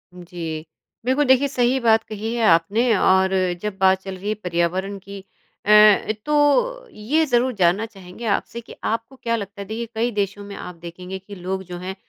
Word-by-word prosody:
जी। 170 Hz, -3 st, -6 dB, 0.4 s
बिल्कुल, 265 Hz, +4 st, +2 dB
देखिए 260 Hz, +1 st, +4 dB
सही 255 Hz, -1 st, +1 dB
बात 225 Hz, -2 st, +3 dB
कही 220 Hz, +1 st, -5 dB
है 235 Hz, -, 0 dB
आपने 205 Hz, +9 st, +3 dB
और 190 Hz, 0 st, +3 dB, 0.3 s
जब 210 Hz, -2 st, -4 dB
बात 190 Hz, 0 st, +4 dB
चल 190 Hz, 0 st, -7 dB
रही 200 Hz, +3 st, -5 dB
है -, -, +1 dB
पर्यावरण 180 Hz, +3 st, -1 dB
की 195 Hz, 0 st, -10 dB, 0.4 s
अ, 210 Hz, 0 st, +6 dB
तो 300 Hz, -, +2 dB
ये 280 Hz, +10 st, 0 dB
ज़रूर 250 Hz, -1 st, +1 dB
जानना 190 Hz, +1 st, +2 dB
चाहेंगे 195 Hz, 0 st, -11 dB
आपसे 230 Hz, +2 st, -1 dB
कि 230 Hz, -, -13 dB
आपको 230 Hz, +4 st, -3 dB
क्या 230 Hz, -3 st, -2 dB
लगता 200 Hz, -2 st, -6 dB
है? -, -, -6 dB
देखिए 225 Hz, +2 st, -4 dB
कई 235 Hz, +2 st, 0 dB
देशों 205 Hz, -1 st, -2 dB
में 200 Hz, 0 st, -9 dB
आप 180 Hz, -, -8 dB
देखेंगे 180 Hz, +3 st, -8 dB
कि 200 Hz, +2 st, -11 dB
लोग 190 Hz, +1 st, -4 dB
जो 180 Hz, -1 st, -8 dB
हैं 185 Hz, +2 st, -6 dB
205 Hz, 190 wpm, -22 LUFS, 185-235 Hz, 0.4 s, अ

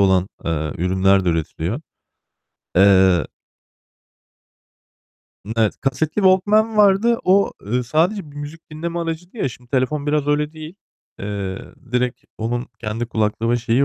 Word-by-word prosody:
olan, 95 Hz, -1 st, +3 dB, 0.2 s
eee, 80 Hz, -2 st, -1 dB
ürünler 95 Hz, +2 st, +3 dB
de 90 Hz, -, +1 dB
üretiliyor. 85 Hz, -, -2 dB, 1.0 s
Eee 95 Hz, -3 st, +5 dB, 2.2 s
Hımm, 105 Hz, -, -5 dB
evet. 110 Hz, -2 st, +1 dB
Kasetli 140 Hz, +3 st, -1 dB
Walkman 210 Hz, +4 st, +4 dB
vardı. 210 Hz, +3 st, +4 dB
O, 195 Hz, +2 st, +4 dB
eee, 125 Hz, +4 st, 0 dB
sadece 160 Hz, -, 0 dB
bir 145 Hz, -, -15 dB
müzik 145 Hz, +3 st, -9 dB
dinleme 170 Hz, +3 st, -4 dB
aracıydı 170 Hz, +4 st, -5 dB
ya, 205 Hz, -, 0 dB
şimdi 125 Hz, 0 st, -14 dB
telefon 140 Hz, +3 st, 0 dB
biraz 150 Hz, -1 st, +1 dB
öyle 150 Hz, +1 st, +1 dB
değil. 155 Hz, +1 st, -9 dB, 0.4 s
Eee, 100 Hz, -2 st, -4 dB, 0.3 s
direkt 125 Hz, -1 st, -1 dB
onun 120 Hz, +3 st, -2 dB
kendi 115 Hz, +1 st, -3 dB
kulaklığı 110 Hz, 0 st, 0 dB
ve 120 Hz, -, +3 dB
şeyi 120 Hz, +3 st, +2 dB
125 Hz, 135 wpm, -21 LUFS, 100-160 Hz, 2.2 s, Eee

